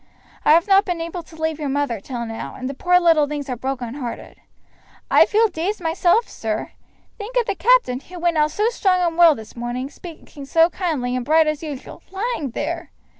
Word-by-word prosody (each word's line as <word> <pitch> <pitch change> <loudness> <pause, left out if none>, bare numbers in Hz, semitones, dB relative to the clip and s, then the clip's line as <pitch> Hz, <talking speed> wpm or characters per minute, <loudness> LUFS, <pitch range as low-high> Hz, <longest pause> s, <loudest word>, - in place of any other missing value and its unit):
I - - +6
have 335 +3 +4
not 390 0 +5
been 355 -3 -3
able 335 +2 -5
to 320 -1 -16
leave 320 -1 -1
your 295 -2 -3
mother 275 -5 -1
till 235 +3 -5
now, 225 0 -6
and 255 - -5
the 275 - -4
poor 360 +6 +3
little 325 -4 +4
things 290 -1 -5
are - - -1
broken 250 -1 -4
hearted. 255 -4 -7 0.7
I - - +6
feel 450 +2 +3
dazed 380 +3 -3
myself, 350 +6 +2
sir. 220 -1 -4 0.5
Think 430 +4 -7
of 485 - +3
the 405 - -1
captain, 420 - +3
who 360 +6 -12
went 345 -1 0
out 300 0 +3
so 420 +8 0
strong 380 -6 +1
and 340 -2 0
well 335 -3 +6
this 220 -3 -11
morning, 245 +3 -4
speaking 305 -4 -11
so 330 +4 +3
kind 325 -10 -2
and 250 0 -1
bright 315 +4 +4
just 305 -1 -2
as 310 - -4
usual, 280 -2 -9
lying 390 - -2
there!" - - -4
320 Hz, 215 wpm, -21 LUFS, 265-360 Hz, 0.7 s, I